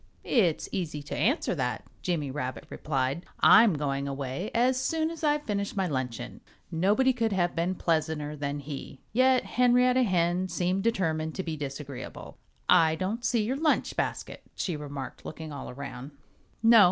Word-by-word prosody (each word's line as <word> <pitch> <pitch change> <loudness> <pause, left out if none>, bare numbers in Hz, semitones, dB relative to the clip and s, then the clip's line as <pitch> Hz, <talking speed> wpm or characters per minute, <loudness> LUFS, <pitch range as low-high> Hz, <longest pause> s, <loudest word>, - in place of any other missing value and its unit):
"It's 180 - +2
easy 155 -5 -3
to 145 - -5
answer 270 - +1
that," - - -2 0.2
Jimmy 155 -6 -1
Rabbit 130 -2 -4
replied. 135 +2 -1 0.2
"I'm 215 -5 +7
going 140 -1 -2
away 140 +6 -3
as 255 +2 +3
soon 320 +4 0
as 330 -1 -9
I've 295 -1 +2
finished 200 -4 -2
my 190 - +2
luncheon." 130 -7 -4 0.3
Nobody 205 +10 +3
could 230 -3 0
have 175 -2 +1
been 175 +3 0
pleasanter 155 -3 -1
than 145 0 -3
he. 140 -1 -7
Yet 255 +1 +4
Henrietta 250 +1 +4
Hen 180 -4 +1
seemed 180 +2 0
determined 160 -8 0
to 190 - -2
be 165 -3 -3
disagreeable. 140 -2 -7 0.3
"I 160 -1 +5
don't 200 +7 -3
see 235 -2 +2
your 255 +6 -1
lunch 310 +1 +1
basket," - - -3
she 175 - -2
remarked, 140 -3 -7
looking 160 -1 -7
all 140 - -6
around. 135 +1 -8 0.5
"No!" 230 0 +8
170 Hz, 160 wpm, -28 LUFS, 145-230 Hz, 0.5 s, No